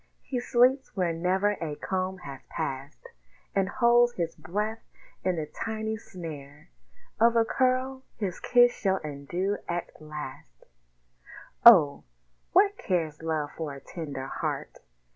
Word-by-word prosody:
He 255 Hz, -, -3 dB
sleeps 250 Hz, +2 st, +2 dB
where 175 Hz, -3 st, +1 dB
never 185 Hz, +5 st, +1 dB
a 155 Hz, -3 st, -3 dB
comb 185 Hz, +3 st, -2 dB
has 135 Hz, -1 st, -8 dB
passed, 135 Hz, +2 st, -5 dB, 0.4 s
And 195 Hz, -1 st, +1 dB
holds 240 Hz, +1 st, +4 dB
his 170 Hz, -5 st, -3 dB
breath 210 Hz, +8 st, -3 dB, 0.4 s
in 185 Hz, -1 st, +1 dB
the 160 Hz, -2 st, -2 dB
tiny 220 Hz, +6 st, -4 dB
snare 150 Hz, -, -9 dB, 0.5 s
Of 230 Hz, +1 st, +5 dB
a 230 Hz, -1 st, +4 dB
curl 260 Hz, +2 st, +1 dB, 0.2 s
his 195 Hz, -5 st, -3 dB
kiss 245 Hz, -1 st, +5 dB
shall 190 Hz, -1 st, 0 dB
undo 155 Hz, +7 st, -3 dB
at 175 Hz, -2 st, -4 dB
last 135 Hz, -, -9 dB, 1.0 s
Oh! 165 Hz, -12 st, +8 dB, 0.5 s
what 400 Hz, +2 st, +4 dB
cares 160 Hz, -5 st, -1 dB
Love 155 Hz, -2 st, -2 dB
for 155 Hz, -4 st, -4 dB
a -, -, -9 dB
tender 140 Hz, -3 st, -6 dB
heart? -, -, -4 dB
185 Hz, 130 wpm, -28 LUFS, 150-230 Hz, 1.0 s, Oh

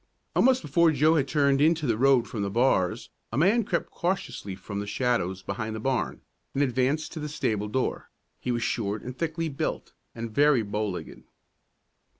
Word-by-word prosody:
Almost 255 Hz, -3 st, +4 dB
before 165 Hz, +3 st, +4 dB
Joe 155 Hz, +2 st, +4 dB
had 145 Hz, -4 st, +2 dB
turned 140 Hz, -1 st, +2 dB
into 160 Hz, 0 st, +3 dB
the 115 Hz, -4 st, +2 dB
road 130 Hz, 0 st, +4 dB
from 110 Hz, -, -4 dB
the 100 Hz, -, -1 dB
bars, 100 Hz, -5 st, +1 dB, 0.2 s
a 115 Hz, -, -3 dB
man 200 Hz, +10 st, +4 dB
crept 180 Hz, -4 st, -2 dB
cautiously 175 Hz, -, -3 dB
from 100 Hz, +2 st, -6 dB
the 100 Hz, -, -4 dB
shadows 100 Hz, -6 st, -1 dB
behind 110 Hz, +2 st, -4 dB
the -, -, -4 dB
barn, 130 Hz, +2 st, -1 dB, 0.3 s
and 140 Hz, -, +3 dB
advanced 130 Hz, +4 st, 0 dB
to 160 Hz, -, -6 dB
the 150 Hz, 0 st, -4 dB
stable 105 Hz, -7 st, -1 dB
door. 130 Hz, +4 st, -2 dB, 0.3 s
He 125 Hz, -, -2 dB
was 120 Hz, -1 st, -1 dB
short 105 Hz, -2 st, -2 dB
and 125 Hz, 0 st, -6 dB
thickly 165 Hz, +2 st, -2 dB
built, 140 Hz, -3 st, -3 dB, 0.2 s
and 115 Hz, 0 st, -5 dB
very 145 Hz, -3 st, +4 dB
bow 105 Hz, +1 st, -2 dB
legged. 90 Hz, -, -7 dB
130 Hz, 180 wpm, -27 LUFS, 110-150 Hz, 0.3 s, Almost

